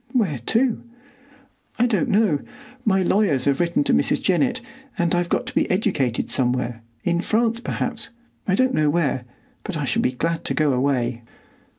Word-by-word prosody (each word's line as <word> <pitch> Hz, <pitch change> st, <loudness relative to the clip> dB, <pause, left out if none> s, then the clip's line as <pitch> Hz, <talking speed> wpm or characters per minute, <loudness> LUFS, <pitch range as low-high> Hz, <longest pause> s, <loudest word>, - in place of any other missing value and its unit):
"Where 190 Hz, -, +1 dB
to?" 240 Hz, 0 st, +2 dB, 1.0 s
"I 240 Hz, -, +3 dB
don't 220 Hz, -6 st, +1 dB
know. 200 Hz, -8 st, +3 dB, 0.4 s
My 190 Hz, -4 st, +2 dB
lawyers 175 Hz, -9 st, +2 dB
have 140 Hz, -1 st, +2 dB
written 170 Hz, -3 st, +2 dB
to -, -, +1 dB
Mrs. 75 Hz, -, +2 dB
Jennett, -, -, +1 dB, 0.4 s
and 170 Hz, -1 st, +1 dB
I've 175 Hz, 0 st, +1 dB
got -, -, 0 dB
to -, -, -6 dB
be -, -, +1 dB
educated 165 Hz, -, 0 dB
somewhere,—in 120 Hz, +4 st, -1 dB
France, 230 Hz, +3 st, +1 dB
perhaps,—I 235 Hz, -4 st, -3 dB
don't 260 Hz, +4 st, +2 dB
know 150 Hz, -1 st, +2 dB
where; 145 Hz, -6 st, 0 dB, 0.4 s
but 200 Hz, -6 st, -4 dB
I 145 Hz, -, -2 dB
shall -, -, +1 dB
be 125 Hz, -, 0 dB
glad 165 Hz, +5 st, -2 dB
to -, -, 0 dB
go 150 Hz, -3 st, +2 dB
away." 125 Hz, -2 st, 0 dB
170 Hz, 165 wpm, -22 LUFS, 130-215 Hz, 1.0 s, I